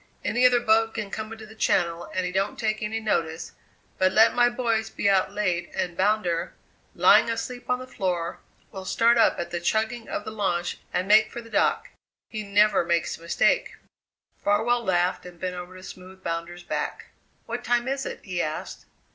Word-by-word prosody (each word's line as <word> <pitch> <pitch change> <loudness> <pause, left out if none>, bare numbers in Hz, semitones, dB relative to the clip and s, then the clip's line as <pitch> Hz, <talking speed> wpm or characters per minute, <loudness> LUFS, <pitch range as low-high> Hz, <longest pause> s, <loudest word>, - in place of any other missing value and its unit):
Any 250 +1 +4
other 245 -1 +3
boat 225 -1 +2
can 210 -3 -4
come 220 0 -5
into 225 -1 -9
the 215 - -13
Channel 170 -5 +1
and 185 -1 -1
he 180 - -2
don't 195 +2 -1
take 215 -1 -1
any 220 +1 -2
notice, 165 -6 -2 0.5
but 185 0 +4
let 220 +3 +5
my 240 0 +4
boys 230 -3 -1
be 205 - -2
out 195 -1 +3
late 180 -4 -1
and 180 -2 -2
Bounder, 185 -4 0 0.4
lying - - +6
asleep 245 +2 -4
on 250 - +2
the 255 - -8
floor, 180 -7 -3 0.3
will 190 -2 -7
start 230 +5 +3
up - - +4
at 175 0 -4
the 175 - -2
chugging 220 +6 -1
of - - -4
the 215 - -5
launch 175 -5 -1
and 185 - -1
make 215 +1 +6
for - - -6
the 230 -1 -12
dock. - - +1 0.4
He 215 - -4
never 205 -1 +3
makes 170 -1 -1
a - - -20
mistake." 170 - +1 0.7
Farwell 225 +4 +2
laughed 180 -2 +1
and 175 -1 -13
bent 180 0 -3
over 180 +1 -8
to 185 - -12
smooth 190 0 -11
Bounder's 170 +1 -4
back. - - -4 0.3
"What 240 +1 -5
time 240 +1 +1
is 270 0 -1
it?" - - -6
he 180 -3 -2
asked. 155 0 -5
205 Hz, 195 wpm, -25 LUFS, 180-225 Hz, 0.7 s, lying